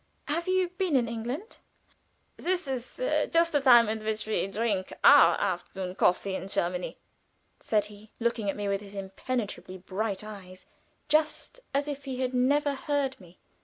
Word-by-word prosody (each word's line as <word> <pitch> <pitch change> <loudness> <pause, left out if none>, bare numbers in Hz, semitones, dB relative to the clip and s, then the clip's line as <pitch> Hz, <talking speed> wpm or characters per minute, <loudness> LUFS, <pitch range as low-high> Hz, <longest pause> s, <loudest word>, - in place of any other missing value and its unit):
"Have 335 +4 -2
you 370 -1 +2
been 365 -6 +1
in 245 -3 +3
England?" 240 - -5 0.8
"This 360 -3 -2
is 255 - -5 0.3
just 335 0 +3
the 290 -2 +2
time 240 -4 +7
at 220 0 -2
which 215 0 -2
we 215 -3 0
drink 200 -2 -1
our - - +8
afternoon 185 -1 -3
coffee 190 +1 +2
in 190 - -4
Germany," 180 -2 -2 0.6
said 210 -2 +1
he, 210 +1 -13
looking 230 -3 0
at - - -1
me 205 -1 -3
with 200 0 0
his 200 0 -11
impenetrably 195 0 -4
bright 195 +2 -3
eyes, 190 -3 -10 0.4
just 315 +10 0
as 280 +1 0
if 285 -1 -5
he 260 -2 -4
had 255 0 -1
never 285 +3 +2
heard 275 -2 -1
me. 175 -1 -16
230 Hz, 165 wpm, -28 LUFS, 200-280 Hz, 0.8 s, our